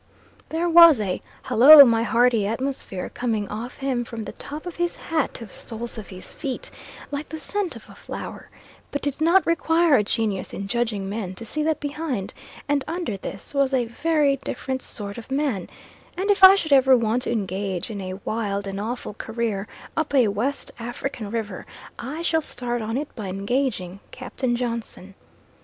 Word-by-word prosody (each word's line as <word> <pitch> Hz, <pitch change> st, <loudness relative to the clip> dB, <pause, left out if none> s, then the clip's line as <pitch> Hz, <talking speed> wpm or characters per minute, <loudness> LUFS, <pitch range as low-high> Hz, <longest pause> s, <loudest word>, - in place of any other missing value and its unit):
There 330 Hz, +2 st, 0 dB
was 335 Hz, -5 st, +8 dB
a 190 Hz, -3 st, -2 dB, 0.2 s
Hallo 280 Hz, +5 st, +10 dB
my 230 Hz, -2 st, +3 dB
Hearty 230 Hz, -2 st, +3 dB
atmosphere 230 Hz, -5 st, -3 dB
coming 220 Hz, -4 st, -1 dB
off 225 Hz, +4 st, -6 dB
him 265 Hz, -3 st, -1 dB
from 230 Hz, -2 st, -6 dB
the -, -, -6 dB
top 300 Hz, +3 st, -2 dB
of 355 Hz, -, -7 dB
his 345 Hz, 0 st, -1 dB
hat 320 Hz, -4 st, -1 dB
to 230 Hz, -, -6 dB
the 200 Hz, -, -14 dB
soles 235 Hz, 0 st, -6 dB
of 210 Hz, -, -9 dB
his 185 Hz, -1 st, -10 dB
feet, 270 Hz, -5 st, -5 dB, 0.4 s
like 290 Hz, +1 st, -4 dB
the 315 Hz, +2 st, -6 dB
scent 405 Hz, +2 st, -1 dB
off -, -, -15 dB
a -, -, -13 dB
flower; -, -, -8 dB, 0.4 s
but 285 Hz, -1 st, -4 dB
it 285 Hz, 0 st, -2 dB
did -, -, -14 dB
not 350 Hz, +4 st, +5 dB
require 335 Hz, -1 st, +3 dB
a 210 Hz, -, +2 dB
genius 210 Hz, -2 st, -2 dB
in 195 Hz, -, -5 dB
judging 220 Hz, -3 st, -1 dB
men 195 Hz, -2 st, -4 dB
to 230 Hz, -, -7 dB
see 305 Hz, +7 st, 0 dB
that 310 Hz, 0 st, 0 dB
behind, 290 Hz, -8 st, -3 dB, 0.3 s
and 285 Hz, -1 st, +1 dB
under 330 Hz, -, -3 dB
this 195 Hz, +4 st, -8 dB
was 275 Hz, -1 st, +2 dB
a 245 Hz, -2 st, +1 dB
very 290 Hz, +3 st, +1 dB
different 260 Hz, 0 st, -4 dB
sort 205 Hz, 0 st, -4 dB
of 230 Hz, -, -12 dB
man, 270 Hz, -9 st, -1 dB, 0.5 s
and 395 Hz, +3 st, +2 dB
if 390 Hz, -1 st, +1 dB
I 380 Hz, +1 st, +11 dB
should 315 Hz, -7 st, 0 dB
ever 265 Hz, -1 st, +6 dB
want 230 Hz, +1 st, 0 dB
to -, -, -1 dB
engage 195 Hz, -1 st, -2 dB
in 205 Hz, -2 st, -5 dB
a 185 Hz, 0 st, -6 dB
wild 205 Hz, -3 st, -2 dB
and 195 Hz, 0 st, -4 dB
awful 230 Hz, +2 st, -4 dB
career 220 Hz, -2 st, -3 dB, 0.3 s
up 315 Hz, -3 st, -1 dB
a 245 Hz, -6 st, +5 dB
West 250 Hz, +8 st, -2 dB
African 240 Hz, -1 st, -5 dB
river 215 Hz, -4 st, -4 dB, 0.4 s
I 300 Hz, +7 st, -5 dB
shall 320 Hz, -1 st, +2 dB
start 240 Hz, -4 st, -4 dB
on 225 Hz, +3 st, -2 dB
it 295 Hz, +1 st, -4 dB
by 215 Hz, -4 st, -6 dB
engaging 195 Hz, -1 st, -2 dB
Captain 255 Hz, -1 st, -3 dB
Johnson. 230 Hz, -5 st, -5 dB
240 Hz, 185 wpm, -24 LUFS, 210-290 Hz, 0.5 s, I